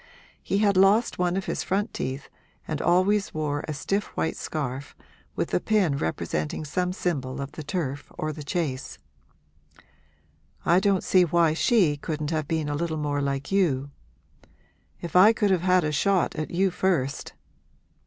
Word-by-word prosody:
He 195 - -1
had 200 -2 +3
lost 200 +4 +4
one 180 0 +1
of 195 - -3
his - - -2
front 200 +2 -1
teeth 130 +2 -4 0.4
and 155 -2 -3
always 190 +3 +2
wore 150 -1 -2
a 155 - -3
stiff 195 +8 -1
white 80 0 0
scarf, 140 -2 -5 0.4
with - - -2
a - - +3
pin 200 -9 +1
representing 80 - -3
some 180 +4 -1
symbol 140 -9 -3
of 140 0 -5
the - - -8
turf 145 -2 -4
or 155 0 -2
the 150 - -8
chase. 145 -3 -3 1.7
'I 175 +2 +5
don't 195 -1 +1
see 185 - +4
why 170 -1 +3
she 170 - +3
couldn't 150 +1 -4
have 155 -3 -1
been 160 -2 -1
a 145 - -2
little 160 +1 -2
more 145 -1 -1
like 140 +2 -2
you. 145 -8 +1 1.1
If 170 - -7
I 200 +5 +8
could 210 -3 +1
have 185 -3 +2
had 180 -1 +3
a 150 - 0
shot 190 +4 +1
at 155 - -3
you 190 +2 +1
first!' 165 -8 -1
160 Hz, 165 wpm, -26 LUFS, 145-185 Hz, 1.7 s, I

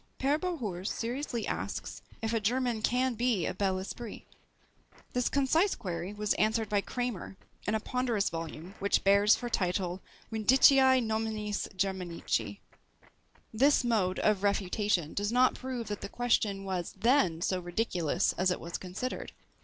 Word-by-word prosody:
Pere 280 +3 +1
Bohours 225 - -3
seriously 240 0 -3
asks - - -4 0.2
if 225 +1 -1
a 225 - +2
German 240 +1 0
can 250 +3 +1
be 230 -6 +1
a - - -1
BEL 190 -1 0
ESPRIT? 205 +4 -7 0.9
This 250 -1 +1
concise 315 +8 +2
query 175 -1 -4
was 210 0 0
answered 220 0 +1
by 205 -1 +2
Kramer, 240 -5 -4 0.3
in 215 - +1
a - - +1
ponderous 240 -3 -1
volume 165 +2 -6
which 200 +1 +1
bears 200 +2 +5
for 245 - -5
title, 185 -4 -1 0.3
Vindiciæ 260 +3 +5
nominis 220 -1 -2
Germanici. 185 -3 -2 1.0
This 275 +5 +4
mode 210 -6 +1
of 210 -3 +2
refutation 200 -4 0
does 205 +1 -1
not 250 +1 +4
prove 255 -3 -5
that 205 - -4
the - - -5
question 215 -5 0
was 185 -3 -3
then 225 - +2
so 185 -1 0
ridiculous 175 -3 0
as 185 0 +3
it 180 - -1
was 170 +1 -5
considered. 190 +8 -5
210 Hz, 145 wpm, -30 LUFS, 190-245 Hz, 1.0 s, bears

